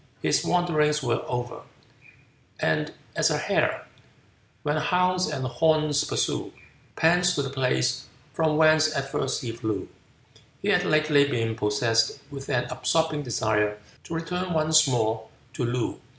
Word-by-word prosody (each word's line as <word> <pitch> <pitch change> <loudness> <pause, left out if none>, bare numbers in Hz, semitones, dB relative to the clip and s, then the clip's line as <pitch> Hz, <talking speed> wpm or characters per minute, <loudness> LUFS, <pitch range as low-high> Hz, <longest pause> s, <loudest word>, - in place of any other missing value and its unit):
His - - +2
wanderings 150 -4 +1
were 120 -1 0
over: 125 0 -4 1.0
"And - - 0 0.2
as - - +3
a - - 0
hare, - - 0 0.8
when 150 +1 0
hounds 180 +3 +1
and 130 - -3
horns 155 +2 +2
pursue, - - -2 0.4
Pants 175 +2 +3
to 145 - 0
the 135 - -4
place 130 0 0 0.3
from 155 -2 +1
whence 155 0 +4
at 135 0 -3
first 130 - -2
he 120 - -3
flew," 110 -4 -4 0.7
he - - -2
had - - +3
lately 155 -2 +3
been 115 -3 -1
possessed 115 +1 +1
with 140 0 -8
an 125 -4 +1
absorbing 160 -2 0
desire 110 -4 0 0.3
to 165 - -5
return 180 +2 -3
once 155 -1 +4
more 110 -3 0 0.3
to 130 - -3
Loo. 120 0 -2
140 Hz, 140 wpm, -25 LUFS, 120-155 Hz, 1.0 s, whence